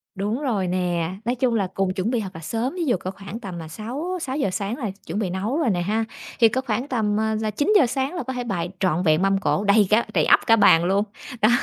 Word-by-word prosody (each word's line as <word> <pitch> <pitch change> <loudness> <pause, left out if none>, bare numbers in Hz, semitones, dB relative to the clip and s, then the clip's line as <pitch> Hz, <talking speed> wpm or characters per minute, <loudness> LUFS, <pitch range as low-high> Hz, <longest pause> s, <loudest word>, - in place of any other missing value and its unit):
Đúng 210 +7 -2
rồi 215 -10 0
nè, 175 -2 -1 0.2
nói 240 +2 0
chung 245 -1 +1
là 200 -4 +1
cùng 195 -1 0
chuẩn 190 +5 -1
bị 240 -3 0
thật 195 - -5
là 160 - -8
sớm, 230 - -2
ví 350 -2 -2
dụ 245 -9 +2
có 185 - -4
khoảng 195 +3 -8
tầm 190 -7 -7
là 165 -1 -7
sáu 255 - -4
sáu 265 -2 -3
giờ 275 - +1
sáng 200 +5 -3
là 225 -8 -3
chuẩn 175 +6 -3
bị 200 -4 -1
nấu 200 +9 -2
rồi 315 -7 +1
nè 180 -4 0
ha, 215 +5 0 0.3
thì 230 - +7
có 260 +4 -1
khoảng 245 0 -2
tầm, 215 -5 0
à, 220 0 0
là 215 -1 -1
9:00 295 - +3
sáng 265 +4 -2
là 345 - -3
có 260 +1 -4
thể 250 -1 -3
bày 180 -7 -2
trọn 180 -2 +1
vẹn 155 -1 +3
mâm 195 0 +3
cỗ, 200 +1 0
đầy 205 0 +4
cả 220 +2 +3
đầy - - +3
ắp - - +6
cả 225 - +7
bàn 185 -6 +5
luôn, 195 +3 +2 0.4
đó. 215 - +5
215 Hz, 275 wpm, -23 LUFS, 190-245 Hz, 0.4 s, thì